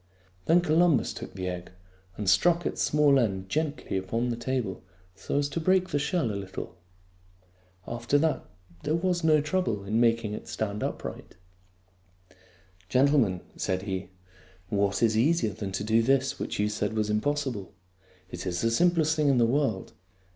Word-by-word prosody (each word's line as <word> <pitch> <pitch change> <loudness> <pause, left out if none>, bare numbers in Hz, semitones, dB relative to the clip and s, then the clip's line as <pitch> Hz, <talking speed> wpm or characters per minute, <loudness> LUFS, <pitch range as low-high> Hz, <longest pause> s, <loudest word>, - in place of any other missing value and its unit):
Then 170 +2 +5
Columbus 165 -2 +3
took - - -9
the 95 -1 -4
egg 90 -1 -5 0.5
and 105 - -4
struck 170 - +4
its - - -2
small 145 -2 +4
end 95 -5 -1
gently 150 -8 -2
upon 115 +6 -1
the 120 - -1
table 120 -5 -3 0.3
so 95 - -3
as 145 0 +1
to 165 - -3
break 185 +2 +2
the 145 - 0
shell 140 - 0
a - - -4
little. 95 -1 -6 1.1
After 120 +4 0
that 155 +1 +1 0.4
there 150 +2 0
was 175 0 0
no 155 -2 +4
trouble 150 - -1
in 105 +3 0
making 115 -2 +2
it - - -7
stand 105 -1 -3
upright. - - -5 0.8
" 95 0 -30
Gentlemen," 125 -7 +3 0.2
said 95 0 -1
he, 95 -2 -4 0.3
" - - -24 0.3
what 100 +1 +1
is 110 -1 +3
easier 120 -2 +2
than 100 -1 -5
to 95 - -2
do 110 +2 +3
this 135 +2 +1
which - - -3
you 105 - +1
said 105 0 -2
was 105 -1 0
impossible? 120 -2 -1 0.6
It 90 +1 -6
is 85 -1 -2
the 115 - +1
simplest 160 +3 +3
thing 150 -1 +1
in 135 -2 +4
the 120 - +5
world. 120 -5 0
115 Hz, 170 wpm, -27 LUFS, 100-150 Hz, 1.1 s, Then